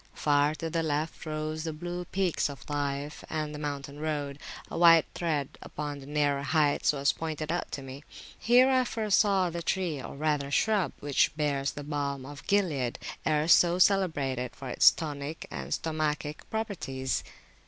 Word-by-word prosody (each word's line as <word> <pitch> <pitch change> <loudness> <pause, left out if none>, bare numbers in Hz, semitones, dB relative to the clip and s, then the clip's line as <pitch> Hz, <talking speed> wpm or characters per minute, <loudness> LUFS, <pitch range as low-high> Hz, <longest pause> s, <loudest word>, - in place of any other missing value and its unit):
Far 145 0 +2
to 165 - -4
the 165 +1 -1
left 155 +1 -2
rose 155 0 -3
the 165 - -2
blue 175 +3 -5
peaks 185 -4 0
of 140 -3 -9
Taif, 145 0 -3
and 155 -1 -3
the 150 - -6
mountain 145 -1 -5
road, 145 -2 -3 0.3
a - - -5
white 165 -1 +7
thread 150 -5 -2
upon 145 -1 -5
the 135 - -11
nearer 145 -1 +1
heights, 145 +1 +2
was 140 -1 +1
pointed 155 -1 -4
out 175 - -2
to 140 - -4
me. 135 +2 -9 0.4
Here 245 +3 +5
I 260 -1 +4
first 220 -4 +1
saw 195 -4 +3
the 170 +1 -4
tree, 170 -5 -1
or - - -8
rather 145 -1 0
shrub, 195 +1 +2
which 145 +1 +2
bears 140 -2 0
the 145 - -7
balm 140 -2 -3
of 145 +1 -10
Gilead, 160 - +1 0.3
erst 155 +1 +5
so 175 0 +2
celebrated 145 -10 +2
for 135 -1 -7
its - - +7
tonic 150 0 -5
and - - -6
stomachic 155 -1 -2
properties. 165 - -2
150 Hz, 170 wpm, -29 LUFS, 140-170 Hz, 0.4 s, white